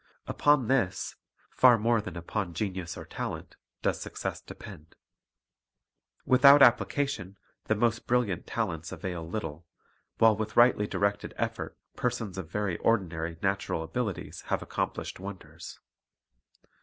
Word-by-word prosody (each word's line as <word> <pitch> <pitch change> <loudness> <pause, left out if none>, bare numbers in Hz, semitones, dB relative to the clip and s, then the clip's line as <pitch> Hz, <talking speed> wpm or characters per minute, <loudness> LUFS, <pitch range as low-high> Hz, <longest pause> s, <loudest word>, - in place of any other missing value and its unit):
Upon 145 -5 +3
this, 120 -8 0 0.4
far 125 -2 +6
more 115 +1 +2
than 105 - -7
upon 85 +1 -3
genius 95 -4 -3
or - - -8
talent, - - -6 0.3
does - - 0
success - - -5
depend. 85 -6 -12 1.3
Without 140 +2 +7
appli 120 -2 +6
cation 115 -10 -2 0.3
the 110 - +1
most 115 +1 0
brilliant 120 -8 0
talents 85 -8 -3
avail 85 -4 -5
little, 85 -4 -5 0.5
while 110 -1 +6
with 110 +1 -4
rightly 120 -3 +5
directed 100 +1 -1
effort - - -3 0.2
persons 115 -6 -2
of 85 -4 -7
very 105 -5 -2
ordinary 85 -7 0
natural 95 -4 0
abilities 105 +3 -4
have - - -1
accomplished - - -3
wonders. 95 0 -9
105 Hz, 125 wpm, -29 LUFS, 90-120 Hz, 1.3 s, Without